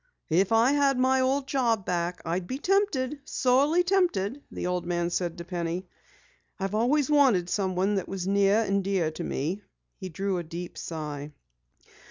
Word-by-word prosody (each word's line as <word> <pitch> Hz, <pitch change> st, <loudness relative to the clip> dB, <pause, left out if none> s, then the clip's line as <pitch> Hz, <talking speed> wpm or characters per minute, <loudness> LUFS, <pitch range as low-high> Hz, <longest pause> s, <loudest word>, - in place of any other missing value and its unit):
"If 185 Hz, +5 st, +3 dB
I 225 Hz, +3 st, +5 dB
had 280 Hz, -2 st, +3 dB
my 260 Hz, +1 st, +3 dB
old 265 Hz, +1 st, +1 dB
job 235 Hz, -7 st, 0 dB
back, 175 Hz, 0 st, -2 dB
I'd 175 Hz, +2 st, -2 dB
be 260 Hz, -, -3 dB
tempted, 300 Hz, -7 st, 0 dB
sorely 280 Hz, +9 st, +2 dB
tempted," 345 Hz, -, +1 dB
the -, -, -5 dB
old 180 Hz, 0 st, -1 dB
man 175 Hz, 0 st, -1 dB
said 175 Hz, -1 st, -2 dB
to 170 Hz, -, -7 dB
Penny. 175 Hz, +1 st, -3 dB, 0.7 s
"I've 195 Hz, +1 st, -2 dB
always 255 Hz, +6 st, +2 dB
wanted 250 Hz, -12 st, +4 dB
someone 190 Hz, 0 st, 0 dB
that 195 Hz, -3 st, -2 dB
was 190 Hz, -2 st, -4 dB
near 200 Hz, +2 st, +3 dB
and 200 Hz, -2 st, 0 dB
dear 185 Hz, -5 st, 0 dB
to 155 Hz, -, -6 dB
me." 170 Hz, +9 st, -2 dB, 0.4 s
He 190 Hz, -2 st, -6 dB
drew 190 Hz, +2 st, -2 dB
a -, -, -4 dB
deep 170 Hz, +2 st, -7 dB
sigh. 150 Hz, -2 st, -6 dB
195 Hz, 170 wpm, -27 LUFS, 175-260 Hz, 0.7 s, I